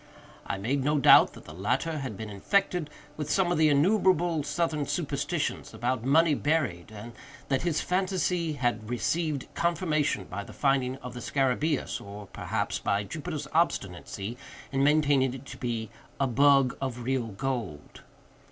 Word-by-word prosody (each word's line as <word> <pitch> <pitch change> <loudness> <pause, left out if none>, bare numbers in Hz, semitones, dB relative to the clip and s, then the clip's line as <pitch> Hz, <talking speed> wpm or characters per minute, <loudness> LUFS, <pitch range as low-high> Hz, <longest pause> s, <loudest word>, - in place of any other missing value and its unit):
I - - -2
made 130 +8 -1
no 150 +2 +2
doubt 140 - +7
that - - -13
the 75 - -10
latter 125 - -1
had 130 -7 -5
been 110 0 -6
infected 180 - 0 0.3
with 150 -1 -4
some 175 +4 +2
of 175 - +1
the 155 -1 +5
innumerable 175 +1 +3
Southern 150 -1 -1
superstitions - - -2
about 120 -1 -1
money 155 +4 +4
buried, 140 - -1
and 110 +2 -9 0.4
that 135 -2 +1
his 170 -3 0
phantasy 180 -3 0
had 120 -6 -1
received 150 +3 -1
confirmation 160 - 0
by 100 +2 -6
the - - -12
finding 135 -2 +1
of 125 -1 -7
the 125 - -7
scarabæus, 135 -4 0
or, 100 +1 -9
perhaps, - - -3
by 100 +1 0
Jupiter's 150 - -5
obstinacy 105 - -1 0.3
in 135 0 +1
maintaining 145 -3 +3
it 135 +1 -10
to - - -9
be 115 -4 -3 0.3
"a 135 - +3
bug 135 0 +4
of 125 -3 -3
real 130 -1 0
gold." 110 - -5
135 Hz, 155 wpm, -28 LUFS, 120-155 Hz, 0.4 s, doubt